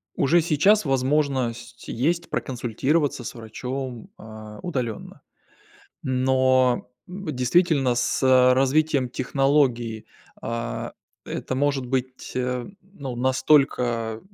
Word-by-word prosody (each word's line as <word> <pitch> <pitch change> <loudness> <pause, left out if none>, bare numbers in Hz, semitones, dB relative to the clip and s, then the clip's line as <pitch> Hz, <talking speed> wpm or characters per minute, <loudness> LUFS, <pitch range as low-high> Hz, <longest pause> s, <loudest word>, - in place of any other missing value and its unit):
уже 170 +5 +3
сейчас 175 +5 +3
возможность 130 -3 -1
есть 170 +8 -1
проконсультироваться 130 +3 -1
с - - -6
врачом, 125 +2 -6
а, 110 -1 -11
удаленно. 125 - -4 0.8
Но, 130 -1 +2 0.2
м, 190 +1 -8
действительно 135 0 +2
с 120 - 0 0.3
развитием 135 0 +2
технологии, 125 -4 0 0.3
а, 115 +1 -4 0.3
это 130 - -4
может 135 -1 0
быть, 130 0 -3
ну, 130 +4 -5
настолько, 125 -4 +2
130 Hz, 90 wpm, -24 LUFS, 120-145 Hz, 0.8 s, уже